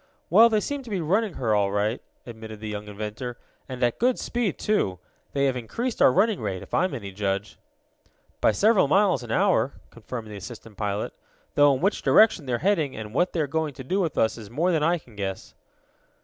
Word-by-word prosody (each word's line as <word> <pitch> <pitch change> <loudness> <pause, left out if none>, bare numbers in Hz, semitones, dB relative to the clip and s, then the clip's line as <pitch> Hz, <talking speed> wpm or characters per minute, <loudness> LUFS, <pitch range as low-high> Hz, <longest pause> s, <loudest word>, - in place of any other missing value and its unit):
"Well, 225 +6 +8
they 215 -2 +2
seem 285 +4 -3
to 250 - -11
be 200 -3 -1
running 195 +4 0
her, 115 -4 0
all 100 -1 +2
right," 105 +4 0 0.2
admitted 110 -2 -9
the 110 - -6
young 105 0 -5
inventor, 105 +4 -6 0.3
"and 130 -1 -4
at 120 -1 +1
good 250 +1 +2
speed, 235 -7 -2
too. 205 - 0 0.4
They 140 0 +2
have 135 -2 +1
increased 220 - -3
our - - +7
running 200 - +2
rate, 95 -4 -3
if - - -16
I 185 - +3
am 185 - -3
any 100 -6 -6
judge." 100 +1 -3 0.8
"By - - +5
several 205 - +4
miles 185 - +3
an 120 - -9
hour," 180 - +2 0.2
confirmed 115 -1 -7
the 105 - -7
assistant 115 +1 -10
pilot. 100 0 -3 0.4
"Though 145 -1 +5
in 130 - -5
which 195 - +1
direction 205 -10 +4
they 125 - -1
are - - +2
heading, 160 -9 +1
and 110 -1 -7
what 175 +7 +1
they 165 - 0
are - - +1
going 150 0 -2
to 130 - -8
do 185 +10 -1
with 170 -6 -1
us 110 +1 +1
is 105 -3 -10
more 165 - +1
than 160 -3 +1
I 170 +3 +3
can 125 -8 -17
guess." 95 -2 -5
130 Hz, 220 wpm, -25 LUFS, -, 0.8 s, Well